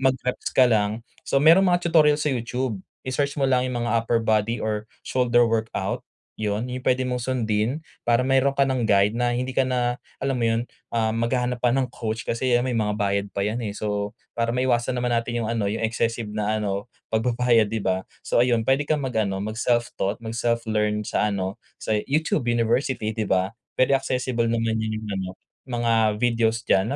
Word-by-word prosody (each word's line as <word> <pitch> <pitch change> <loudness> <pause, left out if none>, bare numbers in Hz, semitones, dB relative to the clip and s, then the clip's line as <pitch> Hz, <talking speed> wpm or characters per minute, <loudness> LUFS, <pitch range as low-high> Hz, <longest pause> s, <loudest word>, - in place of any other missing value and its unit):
mag-reps 130 -1 0
ka 130 - +5
lang. 110 -1 +1 0.2
So, - - +1
merong 165 +6 +7
mga 175 0 +1
tutorial 155 -3 +5
sa 150 - -2
YouTube, 120 -3 -3 0.3
i-search 140 +2 -1
mo - - 0
lang 130 -1 +2
yung 120 -1 -2
mga 115 - +2
upper 115 0 +1
body 110 +1 +1
or 105 0 -2 0.2
shoulder 120 -1 +3
workout. 115 0 -2 0.4
Yun 105 +2 -1
yung 125 0 -5
pwede 130 +1 +3
mong 125 -1 -2
sundin, 120 +3 0 0.2
para 120 +1 +4
meron 135 +1 +3
ka 140 - +4
nang 130 -2 0
guide 100 0 +4
na 120 +1 +1
hindi 125 +1 -2
ka 135 - +3
na 120 -1 0 0.2
alam 135 -1 0
mo 115 - 0
yun, 115 +1 +1 0.3
ah, 110 -1 +2
maghahanap 125 +1 0
pa 120 - +4
ng 135 -1 +1
coach. 110 -1 -3
Kasi 125 +2 -1
yan 120 - +3
may 125 - -1
mga 105 -1 0
bayad 100 0 0
pa 100 - -1
yan, 110 +3 -1
eh. 105 -2 -4
So 105 -1 -2 0.2
para 115 0 +1
maiwasan 125 0 +1
naman 125 0 -1
natin 120 0 -1
yung - - -3
ano 110 -3 0
yung, 110 +2 -3
excessive 115 -1 -1
na 105 0 -1
ano 100 +2 -2 0.3
pagbabayad, 120 0 +3
'di 110 -2 -2
ba? 95 0 +1 0.2
So, - - +2
ayun 120 -2 +3
puwede 135 +4 +2
kang 150 -2 +1
mag 130 -2 -3
ano 100 -3 0
mag-self 115 +2 0
taught, 100 +2 0
mag-self 115 +1 -1
learn 105 0 +1
sa - - +1
ano 95 -1 -3 0.2
sa 110 - 0
YouTube 150 -3 0
university, 120 0 +1
'di 110 -1 -2
ba? 95 0 +2 0.3
Very 130 +2 +3
accessible 125 -3 -1
naman 115 -1 0
yon 110 0 -2
yung 110 - -7
ano 95 -1 -3 0.4
mga 120 -2 0 0.3
videos 115 -1 +2
diyan 95 +4 +3
115 Hz, 200 wpm, -24 LUFS, 110-125 Hz, 0.4 s, merong